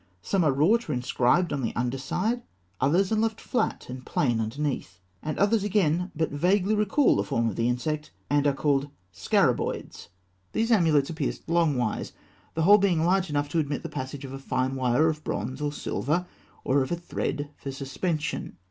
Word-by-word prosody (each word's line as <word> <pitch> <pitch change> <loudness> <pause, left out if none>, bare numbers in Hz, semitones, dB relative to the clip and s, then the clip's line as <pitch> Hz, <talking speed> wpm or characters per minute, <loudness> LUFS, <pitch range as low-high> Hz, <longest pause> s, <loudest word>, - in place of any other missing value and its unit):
Some 195 -3 +1
are 150 - +4
wrought 165 - +2
or - - +1
inscribed 125 +7 +2
on 140 - -1
the 115 - -2
underside; 135 - -1 0.4
others 175 +9 +2
are - - +3
left 220 0 0
flat 250 - -1
and 130 +1 -7
plain 120 -4 0
underneath; 110 -6 -3 0.2
and 155 - -3
others 205 +1 +3
again 180 -4 +1
but 160 +1 0
vaguely 185 +7 +2
recall 215 +6 +3
the - - +1
form 115 -5 0
of 105 - -2
the 115 +1 +1
insect, 150 +5 -2 0.2
and 145 0 +2
are 140 - +3
called 140 0 +1 0.2
scarabaeoids. - - 0 0.5
These 225 +2 +1
amulets 160 -8 +3
are - - -4
pierced 155 -3 -3
longwise, 150 -9 0 0.4
the 160 - +1
hole 205 +5 +7
being 180 -5 +2
large 185 0 +2
enough 145 0 0
to 165 - +1
admit 145 -2 -2
the - - -5
passage 130 +2 -5
of 135 - -8
a 135 - -6
fine 130 0 -1
wire 130 +4 +2
of 155 -1 -2
bronze 130 +7 -3
or 145 -1 0
silver, 150 +3 -1 0.4
or 135 +2 +2
of 130 - -2
a - - +2
thread, 150 -4 -3
for 135 - -6
suspension. 150 +4 -3
150 Hz, 185 wpm, -27 LUFS, 135-180 Hz, 0.5 s, hole